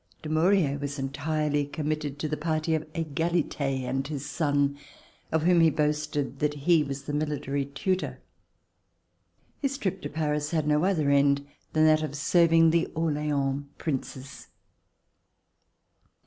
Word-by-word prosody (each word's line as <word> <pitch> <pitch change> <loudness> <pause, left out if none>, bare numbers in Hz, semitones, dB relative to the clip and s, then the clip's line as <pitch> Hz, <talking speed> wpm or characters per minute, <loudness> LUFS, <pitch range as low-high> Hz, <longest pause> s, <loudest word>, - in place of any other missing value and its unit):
Dumouriez 155 -2 +2
was 145 0 -4
entirely 145 +2 -1
committed 150 0 -3
to 155 - -2
the 155 - -2
party 155 +1 -1
of 155 0 -2
Egalite 165 0 -1 0.2
and 135 +2 -2
his 145 -2 -5
son 145 -3 +1 0.6
of 160 -1 +1
whom 175 0 +5
he 165 - +6
boasted 150 -3 -1
that 150 -1 0
he 155 +2 +3
was 140 -1 -5
the 145 - -5
military 145 -2 -1
tutor. 185 +7 -2 1.4
His 275 -1 -1
trip 190 -6 -2
to 145 - -5
Paris 150 -1 -1
had 155 -2 0
no 150 +3 +3
other 160 -7 +2
end 140 0 +3 0.3
than 155 0 +4
that 155 0 +5
of 150 -2 -4
serving 165 +2 +4
the 170 0 +2
Orleans 145 -3 0
Princes. 135 -2 -5
150 Hz, 135 wpm, -27 LUFS, 145-160 Hz, 1.4 s, he